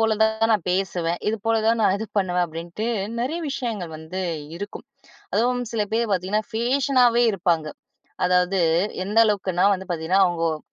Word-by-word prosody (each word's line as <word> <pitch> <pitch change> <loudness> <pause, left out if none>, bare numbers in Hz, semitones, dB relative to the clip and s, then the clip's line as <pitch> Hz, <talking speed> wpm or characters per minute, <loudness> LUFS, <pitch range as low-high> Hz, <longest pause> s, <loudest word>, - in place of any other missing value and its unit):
போல 220 -1 +2
தான் 220 +1 +2
நான் 205 -6 0
பேசுவேன். 180 -2 -1
இது 220 - -3
போல 225 0 +3
தான் 230 0 +2
நான் 190 - +4
இது 220 - -4
பண்ணுவேன். 180 -2 +1
அப்படின்ட்டு, 170 +6 -6 0.3
நிறைய 295 +8 -2
விஷயங்கள் 215 -11 -4
வந்து 160 +4 -6 0.4
இருக்கும். 205 +1 -7 0.5
அதுவும் 245 +3 +1
சில 225 -2 0
பேர் 230 -1 0
பார்த்தீங்கன்னா, 195 +4 0
ஃபேஷனாவே 245 0 +3
இருப்பாங்க. 170 -5 0 0.6
அதாவது 180 +1 +2 0.5
எந்த 210 +3 0
அளவுக்குன்னா 190 -3 +1
வந்து 190 -1 -8
பார்த்தீங்கன்னா, 175 +4 +2
அவங்கோ 165 -2 0
அ - - -11
195 Hz, 155 wpm, -23 LUFS, 180-225 Hz, 0.6 s, நான்